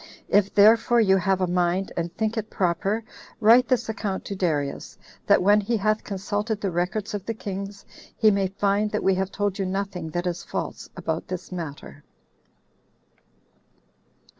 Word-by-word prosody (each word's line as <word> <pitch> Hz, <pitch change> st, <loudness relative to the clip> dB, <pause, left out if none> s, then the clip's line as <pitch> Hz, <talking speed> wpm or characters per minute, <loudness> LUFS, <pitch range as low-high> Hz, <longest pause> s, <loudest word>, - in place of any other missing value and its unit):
If 200 Hz, -1 st, +3 dB
therefore 225 Hz, +3 st, +6 dB
you 195 Hz, -4 st, +5 dB
have 190 Hz, +1 st, +1 dB
a -, -, +3 dB
mind, 180 Hz, +1 st, 0 dB
and 170 Hz, 0 st, -2 dB
think 220 Hz, 0 st, 0 dB
it 220 Hz, -1 st, -3 dB
proper, 195 Hz, +4 st, 0 dB, 0.4 s
write 235 Hz, +3 st, +6 dB
this 255 Hz, -2 st, +1 dB
account 205 Hz, -3 st, -3 dB
to 200 Hz, -, -4 dB
Darius, 155 Hz, -7 st, -2 dB, 0.3 s
that -, -, +5 dB
when 205 Hz, +2 st, +5 dB
he 230 Hz, +3 st, 0 dB
hath 215 Hz, +1 st, 0 dB
consulted 205 Hz, +2 st, -3 dB
the 195 Hz, -3 st, -2 dB
records 180 Hz, +5 st, -2 dB
of 205 Hz, -2 st, -3 dB
the 225 Hz, -, -2 dB
kings, 200 Hz, -1 st, -6 dB, 0.3 s
he 220 Hz, -2 st, +5 dB
may 195 Hz, -1 st, +1 dB
find 200 Hz, +2 st, 0 dB
that 210 Hz, -, -2 dB
we 195 Hz, -, +4 dB
have 190 Hz, 0 st, -1 dB
told 205 Hz, -1 st, -2 dB
you 195 Hz, -, 0 dB
nothing 190 Hz, -3 st, -3 dB
that 175 Hz, +3 st, -3 dB
is 175 Hz, -1 st, -3 dB
false -, -, -5 dB
about 165 Hz, -2 st, -3 dB
this 185 Hz, 0 st, -6 dB
matter." 150 Hz, -4 st, -7 dB
195 Hz, 165 wpm, -25 LUFS, 180-210 Hz, 0.4 s, therefore